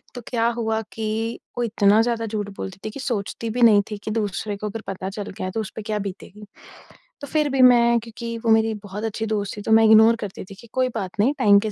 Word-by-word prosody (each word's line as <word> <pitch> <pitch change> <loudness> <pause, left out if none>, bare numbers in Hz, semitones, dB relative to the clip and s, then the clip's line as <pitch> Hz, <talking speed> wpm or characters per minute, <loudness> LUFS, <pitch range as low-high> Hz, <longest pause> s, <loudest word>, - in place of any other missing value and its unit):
तो 245 - -6
क्या 230 -2 +1
हुआ 220 -1 -1
कि 225 +1 -3 0.2
वो 245 - 0
इतना 210 -2 +3
ज़्यादा 230 -1 -1
झूठ 210 -2 -3
बोलती 190 0 -6
थी - - -2
कि 275 - -9
सोचती 230 -2 -3
भी 245 +3 -2
नहीं 215 -3 +7
थी 210 - -3
कि 215 - -4
दूसरे 210 -1 -2
को 210 +1 -4
अगर 220 +2 -6
पता 190 0 -4
चल 205 0 -6
गया, 185 -1 -5
तो 225 - -2
उस 215 - -7
पे 220 - -5
क्या 210 0 -3
बीतेगी। 200 +1 -8 0.8
तो 285 - -6
फिर 300 0 +1
भी 270 -1 +1
मैं 235 -2 +6
क्योंकि 230 +1 -7
वो 225 - +4
मेरी 220 0 +3
बहुत 205 +2 -7
अच्छी 225 0 -2
दोस्त 210 -2 -2
थी - - -5
तो 220 - -3
मैं 225 0 +6
इग्नोर 220 +1 +7
करती 195 - -8
थी 195 - -12
कि 235 - -15
कोई 255 -1 +1
बात 195 -1 -5
नहीं 260 +7 +3
टाइम 205 -5 +6
के 215 0 -3
220 Hz, 250 wpm, -23 LUFS, 205-230 Hz, 0.8 s, नहीं